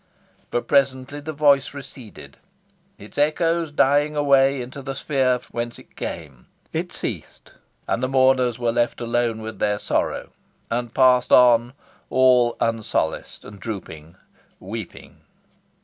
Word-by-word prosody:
But 120 - -2
presently 140 0 +1
the 150 +2 -6
voice 145 -2 +2
receded, 130 -5 -11 0.6
its 105 +7 -9
echoes 165 +2 +1
dying 145 +1 +2
away 140 -2 +3
into 125 +3 -7
the 135 0 -5
sphere 130 -4 +1
whence 120 0 -4
it - - -18
came. 70 -7 -7 0.3
It - - -3
ceased; - - -6 0.3
and 115 - -1
the 130 - 0
mourners 130 -2 +3
were 120 -1 0
left 120 +1 0
alone 120 0 0
again 110 - -9
with 110 0 -7
their 105 0 +1
sorrow, - - -2 0.4
and 120 0 -2
passed 125 -1 +4
on 120 0 +5 0.4
all 125 -2 +4
unsolaced, 115 -8 -2
and 105 -1 -11
drooping, 85 -6 -8 0.4
weeping. 105 +1 -8
125 Hz, 135 wpm, -22 LUFS, 115-140 Hz, 0.6 s, on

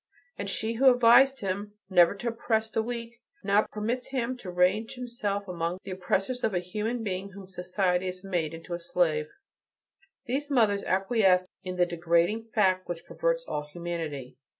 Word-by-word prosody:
And - - -4
she 220 +1 -1
who 260 +3 +6
advised 245 +3 +6
him 200 +1 -3
never 180 -1 +5
to 235 +4 -3
oppress 225 -1 -1
the 225 - +1
weak, 235 +1 -6 0.2
now 205 +1 +3
permits 230 +4 -2
him 255 -1 -2
to 200 -7 -8
range 180 +7 +1
himself 210 -5 -3
among 170 -1 -2
the 195 - -7
oppressors 195 +6 -1
of 215 -4 +1
a - - +2
human 215 +6 -3
being 195 -1 -3
whom 195 -1 -11
society 180 0 0
has 185 0 -6
made 170 -5 -2
into 165 +2 -8
a 170 - -2
slave." 160 -3 +1 1.0
These 280 +4 -2
mothers 220 -7 +3
acquiesce 190 -1 +3 0.2
in 185 -1 -4
the 180 -1 +3
degrading 170 +5 +1
fact 190 -4 +1
which 170 -1 -5
perverts - - -1
all 150 0 -3
humanity. 165 -7 -5
195 Hz, 170 wpm, -28 LUFS, 180-230 Hz, 1.0 s, who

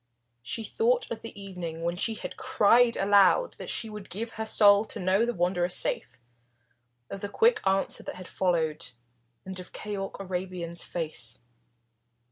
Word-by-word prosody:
She 220 - -2
thought 475 - +1
of 230 - -4
the 230 -3 -7
evening 175 -4 -6
when 170 +1 -1
she 220 +5 +1
had - - -6
cried 235 +3 +4
aloud 200 - +4
that - - -6
she 225 - +1
would 210 -2 -9
give 225 +5 -4
her 220 0 -5
soul 205 -1 +6
to 220 - -5
know 190 +4 +2
the 240 - 0
Wanderer 175 0 +1
safe, - - -2 0.9
of 195 - -6
the 205 - -3
quick 455 - +3
answer 195 0 +1
that - - -7
had 185 0 -9
followed, 160 -7 -1 0.5
and 190 0 -5
of 180 - -10
Keyork 200 -2 -5
Arabian's 180 -2 -4
face. 130 -9 -3
195 Hz, 160 wpm, -28 LUFS, 175-220 Hz, 0.9 s, soul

